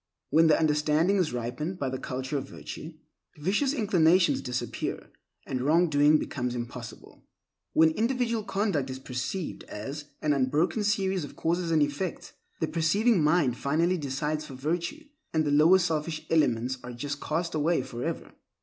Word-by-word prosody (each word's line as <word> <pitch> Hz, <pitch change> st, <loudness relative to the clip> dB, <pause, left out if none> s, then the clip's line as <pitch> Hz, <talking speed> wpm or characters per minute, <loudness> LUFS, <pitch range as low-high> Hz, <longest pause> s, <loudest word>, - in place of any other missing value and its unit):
When 160 Hz, +3 st, +5 dB
the 155 Hz, -, +5 dB
understanding 155 Hz, +4 st, +2 dB
is 180 Hz, -5 st, +1 dB
ripened 125 Hz, +9 st, -3 dB
by 140 Hz, -6 st, -2 dB
the 130 Hz, 0 st, -4 dB
culture 130 Hz, +2 st, -4 dB
of 135 Hz, -1 st, -3 dB
virtue, 155 Hz, +1 st, -8 dB, 0.4 s
vicious 200 Hz, -, +1 dB
inclinations 185 Hz, -, +3 dB
disappear, 125 Hz, 0 st, -4 dB, 0.3 s
and 130 Hz, -1 st, -3 dB
wrong 160 Hz, +5 st, +3 dB
doing 145 Hz, +1 st, +5 dB
becomes 125 Hz, -4 st, -3 dB
impossible. 120 Hz, -1 st, -8 dB, 0.5 s
When 160 Hz, 0 st, +5 dB
individual 230 Hz, +3 st, 0 dB
conduct 195 Hz, -10 st, -1 dB
is 130 Hz, -, -5 dB
perceived 130 Hz, +7 st, -4 dB
as 135 Hz, +8 st, -6 dB, 0.2 s
an 150 Hz, -1 st, +3 dB
unbroken 145 Hz, -, +1 dB
series 195 Hz, -3 st, +1 dB
of 145 Hz, -, -9 dB
causes 170 Hz, +1 st, -1 dB
and 160 Hz, -2 st, +4 dB
effects, 145 Hz, +5 st, -4 dB, 0.3 s
the 160 Hz, -, 0 dB
perceiving 180 Hz, +5 st, +2 dB
mind 150 Hz, -6 st, +3 dB
finally 170 Hz, +6 st, +1 dB
decides 150 Hz, +2 st, -2 dB
for 135 Hz, -, -9 dB
virtue, 170 Hz, -, -3 dB, 0.3 s
and 155 Hz, -1 st, +2 dB
the 145 Hz, -, 0 dB
lower 155 Hz, +6 st, +6 dB
selfish 160 Hz, -3 st, -2 dB
elements 130 Hz, -5 st, +2 dB
are 125 Hz, -, -7 dB
just 145 Hz, +4 st, -5 dB
cast 165 Hz, +2 st, -2 dB
away 155 Hz, -1 st, +1 dB
forever. 120 Hz, -2 st, -5 dB
155 Hz, 155 wpm, -28 LUFS, 135-175 Hz, 0.5 s, lower